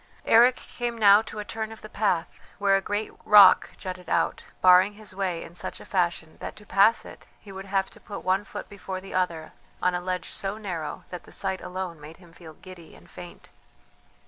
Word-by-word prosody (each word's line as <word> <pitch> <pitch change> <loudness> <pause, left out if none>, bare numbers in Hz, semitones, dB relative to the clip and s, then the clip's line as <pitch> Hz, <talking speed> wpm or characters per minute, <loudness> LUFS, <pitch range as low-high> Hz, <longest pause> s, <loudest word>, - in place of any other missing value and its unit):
Eric 240 +3 +6
came 240 -2 -5
now 205 -1 +7
to 220 -1 -10
a 210 - -5
turn 220 0 -5
of 225 - -11
the - - -7
path 190 -6 -1 0.2
where 200 -1 +3
a 195 - +1
great 205 +2 -3
rock 200 -3 +7
jutted 180 -2 -7
out, 165 - 0 0.2
barring 185 +2 +6
his 210 -2 -12
way 185 -3 -2
in 165 - -12
such 180 - -4
a - - -12
fashion 175 -4 -1
that - - -7
to 210 - -15
pass 210 +3 +3
it - - -13
he 200 - -13
would 190 0 -8
have 195 0 -1
to - - -16
put 205 - -9
one 190 +2 +1
foot - - -8
before 195 -2 -7
the 195 +1 -11
other 170 -4 -2 0.3
on 180 - +1
a 180 - -2
ledge 180 0 -4
so 195 +2 -1
narrow 175 -8 -5
that 180 - -8
the - - -15
sight 190 -1 -2
alone 180 -3 -6
made 155 +2 -11
him 175 -2 -19
feel 160 -3 -13
giddy 175 -2 -13
and - - -19
faint. - - -12
190 Hz, 215 wpm, -26 LUFS, 180-205 Hz, 0.3 s, now